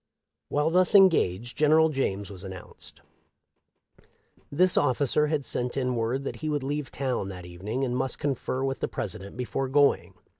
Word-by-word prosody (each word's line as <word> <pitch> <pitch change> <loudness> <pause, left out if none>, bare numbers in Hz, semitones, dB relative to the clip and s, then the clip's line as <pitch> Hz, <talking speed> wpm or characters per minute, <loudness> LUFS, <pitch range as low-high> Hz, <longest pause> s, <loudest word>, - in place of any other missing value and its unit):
While 150 +2 +1
thus 185 +3 +3
engaged 120 - +4
General 155 +1 +4
James 100 -9 -2
was 95 -1 -8
announced. 95 -2 -11 1.5
This 180 +5 +3
ofificer 145 +2 +2
had 150 -3 -1
sent 125 +2 -1
in 125 -2 0
word 120 +4 -1
that - - -5
he 155 - -4
would 145 -2 -1
leave 145 -1 -3
town 130 -8 -2
that 90 -2 -8
evening, 100 +9 -4
and 125 -2 -1
must 130 +1 -2
confer 135 -2 -2
with 135 0 -2
the - - -1
President 100 +4 -6
before 125 +2 -2
going. 145 +1 +2
135 Hz, 160 wpm, -27 LUFS, 115-150 Hz, 1.5 s, engaged